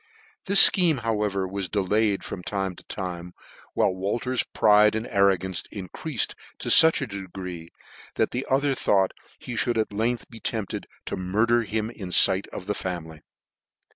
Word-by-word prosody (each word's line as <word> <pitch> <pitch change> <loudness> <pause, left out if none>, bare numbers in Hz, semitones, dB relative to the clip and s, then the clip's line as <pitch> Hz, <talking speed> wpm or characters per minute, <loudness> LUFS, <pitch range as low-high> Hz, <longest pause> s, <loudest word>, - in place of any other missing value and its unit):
This 200 +1 +10
fcheme, 165 -9 +2
however, 105 -4 -1
he 95 0 -4
delayed 105 +2 0
from 90 - -7
time 95 -1 -4
to - - -15
time, 90 -2 -6 0.4
while - - +2
Wolter's 115 +7 -1
pride 105 0 +3
and 110 +1 -3
arrogance 95 -3 0
en 95 -4 -8
creafed 155 -8 -2 0.2
to - - -5
fuch 160 -2 +7
a - - -1
degree, 95 -5 -8 0.5
that - - -1
ihe 125 - -2
other 140 +1 +1
thought 95 -6 +1 0.3
he 125 - -8
fhould 120 0 0
at 110 -1 -2
length 115 +3 -2
be 115 - -11
tempted 110 -5 -4 0.2
to - - -4
murder 110 +6 +1
him 110 0 -3
in 95 -6 -9 0.2
light 95 +1 -3
of 90 - -9
the 105 - -2
family. 80 -5 -6
105 Hz, 165 wpm, -24 LUFS, 95-115 Hz, 0.5 s, This